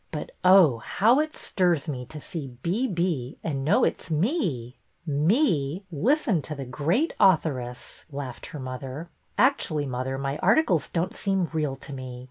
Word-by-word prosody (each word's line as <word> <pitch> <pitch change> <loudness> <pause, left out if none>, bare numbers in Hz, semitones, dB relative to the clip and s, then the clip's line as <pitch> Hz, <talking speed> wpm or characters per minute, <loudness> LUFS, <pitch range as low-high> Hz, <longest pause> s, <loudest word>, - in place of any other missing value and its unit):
But - - -5
oh, 180 -10 +6
how 225 - +3
it 310 0 -1
stirs 175 -5 +1
me 125 -5 -4
to 150 - -8
see 150 -1 -6
' 125 - -35
B. 215 +10 0
B.' 170 - -2
and 140 -4 -2
know 150 - +3
it - - +1
's - - -10
me! 155 - -1
" - - -44
' - - -43 0.2
Me! 185 - +2
' - - -38
Listen 220 - +2
to 150 - -6
the 135 -1 -6
great 160 - 0
authoress! 135 -10 +1
" - - -31
laughed 135 -3 -6
her 150 - -8
mother. 130 +4 -6 0.3
Actually, 160 - +2
mother, 130 0 -3
my 140 +2 -3
articles 190 - +3
don't 175 +3 -2
seem 195 -4 0
real 150 -4 -1
to 140 +1 -9
me. 130 -2 -7
155 Hz, 185 wpm, -26 LUFS, 135-190 Hz, 0.3 s, oh